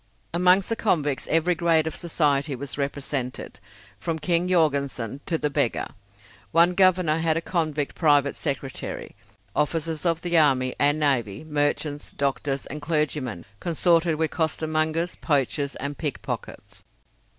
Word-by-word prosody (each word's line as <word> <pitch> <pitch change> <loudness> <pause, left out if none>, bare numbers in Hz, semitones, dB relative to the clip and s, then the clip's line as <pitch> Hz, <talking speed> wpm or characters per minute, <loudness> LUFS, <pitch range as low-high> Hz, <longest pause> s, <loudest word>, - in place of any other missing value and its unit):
Amongst 180 +2 +4
the 230 - 0
convicts 150 -11 0
every 165 +2 +3
grade 165 -2 +2
of 160 - -3
society 145 -4 0
was 140 +2 -4
represented, 140 -2 -4 0.4
from 165 +8 -2
King 170 +2 +1
Jorgensen 140 - 0
to 165 - +1
the 150 -1 -1
beggar. 120 - 0 0.6
One 170 +2 +5
Governor 180 -4 +3
had 160 -1 +1
a - - +2
convict 155 -5 -1
private 145 -3 +3
secretary. 135 -3 -4 0.4
Officers 160 +1 -1
of 165 -2 +1
the 175 -2 +3
army 130 -4 +3
and 145 +2 +3
navy, 125 -7 +1
merchants, 145 -1 -1
doctors, 140 0 -1
and 150 +2 -7
clergymen 150 - -1
consorted 170 -1 +2
with 160 0 -1
costermongers, 160 +1 0
poachers, 140 -1 0
and 140 +1 -4
pickpockets. 150 -5 -5
155 Hz, 130 wpm, -25 LUFS, 140-165 Hz, 0.6 s, One